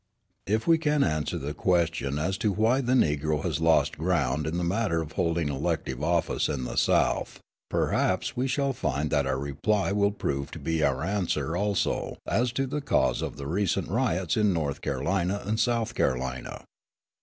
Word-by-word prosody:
If 110 Hz, +3 st, 0 dB
we 165 Hz, -1 st, +4 dB
can 150 Hz, -2 st, +2 dB
answer 75 Hz, -1 st, -1 dB
the 75 Hz, +2 st, -4 dB
question 80 Hz, -4 st, 0 dB
as 90 Hz, +6 st, -1 dB
to 105 Hz, -, +1 dB
why 110 Hz, +7 st, +2 dB
the 125 Hz, 0 st, 0 dB
Negro 75 Hz, -, +1 dB
has -, -, -1 dB
lost 80 Hz, -3 st, +3 dB
ground 75 Hz, -4 st, 0 dB
in 80 Hz, +2 st, -2 dB
the 90 Hz, -, -1 dB
matter 95 Hz, -1 st, 0 dB
of 80 Hz, -1 st, -5 dB
holding 85 Hz, -3 st, 0 dB
elective 65 Hz, -1 st, -2 dB
office 85 Hz, 0 st, +1 dB
in 70 Hz, -4 st, -2 dB
the -, -, -5 dB
South, -, -, +1 dB, 0.3 s
perhaps -, -, 0 dB
we 125 Hz, +2 st, 0 dB
shall 140 Hz, +1 st, 0 dB
find 75 Hz, -, -2 dB
that 70 Hz, -2 st, +2 dB
our 65 Hz, 0 st, 0 dB
reply 80 Hz, +10 st, 0 dB
will 100 Hz, 0 st, +3 dB
prove 70 Hz, -9 st, -3 dB
to -, -, -6 dB
be 80 Hz, -1 st, -1 dB
our 70 Hz, -2 st, +1 dB
answer 85 Hz, -5 st, -1 dB
also 100 Hz, +1 st, -1 dB
as 120 Hz, +3 st, +1 dB
to 135 Hz, +1 st, 0 dB
the 145 Hz, +3 st, -3 dB
cause 140 Hz, -, +1 dB
of -, -, -4 dB
the 70 Hz, -, -6 dB
recent 95 Hz, +3 st, 0 dB
riots 95 Hz, -6 st, 0 dB
in 105 Hz, -2 st, +3 dB
North 75 Hz, -5 st, -2 dB
Carolina 90 Hz, +8 st, -1 dB
and 110 Hz, +2 st, -1 dB
South 115 Hz, -1 st, +1 dB
Carolina. 65 Hz, 0 st, -2 dB
85 Hz, 180 wpm, -27 LUFS, 75-105 Hz, 0.3 s, we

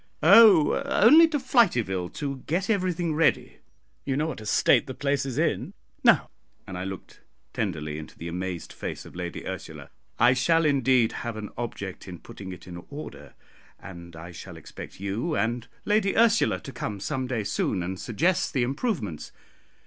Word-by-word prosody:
"Oh, 195 Hz, -10 st, +7 dB
only 310 Hz, +10 st, +6 dB
to 315 Hz, -2 st, -1 dB
Flityville 125 Hz, -, +1 dB
to 140 Hz, -2 st, -4 dB
get 185 Hz, +7 st, 0 dB
everything 180 Hz, -5 st, 0 dB
ready; 160 Hz, +2 st, +1 dB, 0.5 s
you 135 Hz, -1 st, -1 dB
know 150 Hz, -, +1 dB
what 160 Hz, -8 st, -5 dB
a 110 Hz, -, -8 dB
state 145 Hz, -, +3 dB
the 130 Hz, -, -6 dB
place 140 Hz, -1 st, -1 dB
is 130 Hz, -1 st, -5 dB
in. 160 Hz, -, -1 dB, 0.3 s
Now," -, -, +4 dB, 0.3 s
and 95 Hz, -, -8 dB
I 90 Hz, +1 st, -4 dB
looked 95 Hz, -2 st, -8 dB, 0.3 s
tenderly 75 Hz, -6 st, -3 dB
into 80 Hz, -, -11 dB
the 85 Hz, -, -7 dB
amazed 90 Hz, 0 st, -5 dB
face -, -, -6 dB
of -, -, -13 dB
Lady 90 Hz, -1 st, -6 dB
Ursula, -, -, -7 dB, 0.3 s
"I 120 Hz, +2 st, +5 dB
shall 165 Hz, +6 st, +2 dB
indeed 130 Hz, -5 st, +3 dB
have 120 Hz, -2 st, -5 dB
an 105 Hz, -1 st, -6 dB
object 100 Hz, -6 st, -6 dB
in 90 Hz, -2 st, -7 dB
putting 95 Hz, +3 st, -10 dB
it 90 Hz, -, -10 dB
in 85 Hz, -1 st, -9 dB
order, 145 Hz, +2 st, -9 dB, 0.4 s
and 85 Hz, -3 st, -11 dB
I 85 Hz, +2 st, -9 dB
shall 85 Hz, -, -10 dB
expect -, -, -11 dB
you 105 Hz, -, -2 dB
and 115 Hz, 0 st, -1 dB, 0.2 s
Lady 205 Hz, -1 st, +1 dB
Ursula 230 Hz, 0 st, +3 dB
to 135 Hz, -, -8 dB
come 105 Hz, -5 st, -5 dB
some 130 Hz, +6 st, -3 dB
day 120 Hz, -4 st, -2 dB
soon 100 Hz, -2 st, -1 dB
and 95 Hz, +1 st, -5 dB
suggest 165 Hz, -, 0 dB
the 130 Hz, -, +1 dB
improvements. 130 Hz, -, -3 dB
120 Hz, 170 wpm, -26 LUFS, -, 0.5 s, Oh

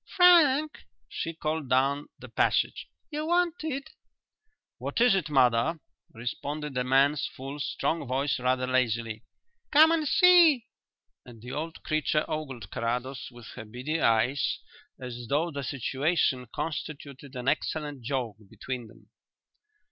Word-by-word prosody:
Frank," 310 Hz, -5 st, +5 dB, 0.3 s
she 165 Hz, -, -4 dB
called 155 Hz, -3 st, -3 dB
down 135 Hz, +3 st, +2 dB
the -, -, -11 dB
passage, -, -, 0 dB, 0.2 s
"you're 305 Hz, +1 st, -3 dB
wanted." 330 Hz, -5 st, -1 dB, 0.9 s
"What -, -, -3 dB
is 245 Hz, -2 st, +5 dB
it, 185 Hz, -6 st, 0 dB
mother?" 130 Hz, +3 st, +3 dB, 0.3 s
responded 140 Hz, +5 st, -5 dB
a 125 Hz, -, +1 dB
man's 135 Hz, +3 st, +3 dB
full, 135 Hz, +3 st, -7 dB
strong 150 Hz, +1 st, -2 dB
voice 135 Hz, +2 st, 0 dB
rather 125 Hz, 0 st, +1 dB
lazily. 115 Hz, -3 st, 0 dB, 0.5 s
"Come 315 Hz, +2 st, +7 dB
and 320 Hz, -2 st, +1 dB
see!" 340 Hz, -9 st, +6 dB, 0.6 s
and 120 Hz, -2 st, -13 dB
the 125 Hz, +3 st, -9 dB
old 160 Hz, +4 st, -5 dB
creature 155 Hz, -1 st, 0 dB
ogled 130 Hz, -10 st, -5 dB
Carrados 125 Hz, +2 st, -3 dB
with 120 Hz, -2 st, -13 dB
her -, -, -8 dB
beady 125 Hz, +9 st, -4 dB
eyes 120 Hz, +5 st, +2 dB, 0.4 s
as 120 Hz, -2 st, -7 dB
though 160 Hz, +4 st, +1 dB
the 140 Hz, -2 st, -4 dB
situation 135 Hz, 0 st, 0 dB
constituted 140 Hz, -1 st, -6 dB
an 125 Hz, 0 st, -5 dB
excellent 150 Hz, -1 st, -1 dB
joke 120 Hz, -4 st, -3 dB
between 120 Hz, +2 st, -6 dB
them. 110 Hz, -, -20 dB
140 Hz, 130 wpm, -28 LUFS, 125-165 Hz, 0.9 s, Come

